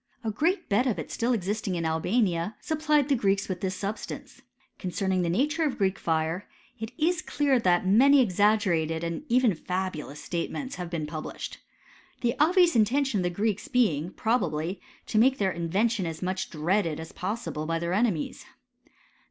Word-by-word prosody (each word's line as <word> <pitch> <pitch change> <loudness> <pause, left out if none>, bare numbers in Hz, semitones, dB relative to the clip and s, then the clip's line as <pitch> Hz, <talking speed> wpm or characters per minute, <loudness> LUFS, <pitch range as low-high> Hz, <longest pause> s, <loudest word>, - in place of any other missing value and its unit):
A 220 - -1
great 330 - 0
bed 235 +6 +2
of 235 - 0
it - - -6
still 240 +1 0
existing 205 -2 -1
in 165 -1 -2
Albania, 175 +3 0
supplied 305 -2 +1
the 285 - +3
Greeks 200 -4 +1
with 185 -2 -4
this 190 -1 -1
substance. 205 +3 -6 0.4
Concerning 185 0 -1
the 170 - 0
nature 295 - +1
of 295 -4 +1
the - - -11
Greek 195 -1 0
fire, 160 +3 -1 0.3
it 225 +1 -5
is 350 +3 +1
clear 285 -6 +1
that 180 -4 +2
many 265 +9 +6
ex 205 -8 +1
aggerated 170 -6 +2
and 170 0 -3
even 245 -3 +4
fabulous 175 -4 -4
statements 220 +10 -4
have 180 -2 -5
been 165 -3 -3
published. 155 +1 -6 0.6
The 235 -2 +1
obvious 345 +2 +5
intention 235 +1 +2
of - - 0
the - - +2
Greeks 205 +3 -1
be 245 - +3
ing, 155 +5 -4
probably, 180 -6 -1 0.2
to 215 - +1
make 265 +3 +4
their 195 -2 +1
invention 190 +4 0
as 165 +1 -5
much 185 +1 -2
dread 175 +5 +1
ed 155 -1 -4
as 160 - -8
possible 185 -6 -4
by 165 0 0
their 170 +1 -2
enemies. 205 -6 -1
195 Hz, 180 wpm, -27 LUFS, 170-240 Hz, 0.6 s, many